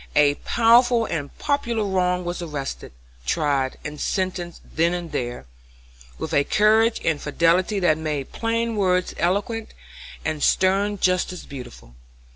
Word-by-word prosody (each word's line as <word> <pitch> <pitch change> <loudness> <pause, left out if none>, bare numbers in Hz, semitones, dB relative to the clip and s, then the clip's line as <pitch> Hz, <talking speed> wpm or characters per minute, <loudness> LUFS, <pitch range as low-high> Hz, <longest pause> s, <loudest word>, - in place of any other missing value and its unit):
A 145 -1 +5
powerful 235 - +4
and 145 -7 -4
popular 235 -6 0
wrong 180 -2 0
was 175 +1 -3
arrested, 150 -5 -5 0.3
tried, 135 - 0
and 150 -1 -6
sentenced 185 -3 -2
then 170 +2 +2
and 175 -2 -6
there, 120 - -4 0.7
with - - -5
a 145 - +4
courage 220 +6 +3
and 155 -3 +1
fidelity 170 +7 +2
that 160 -3 +3
made 150 -4 -3
plain 230 0 -1
words 185 -2 +1
eloquent, 205 +5 -1 0.5
and 155 -2 -2
stern 195 +5 +2
justice 180 -1 0
beautiful. 125 - -10
180 Hz, 130 wpm, -23 LUFS, 150-210 Hz, 0.7 s, A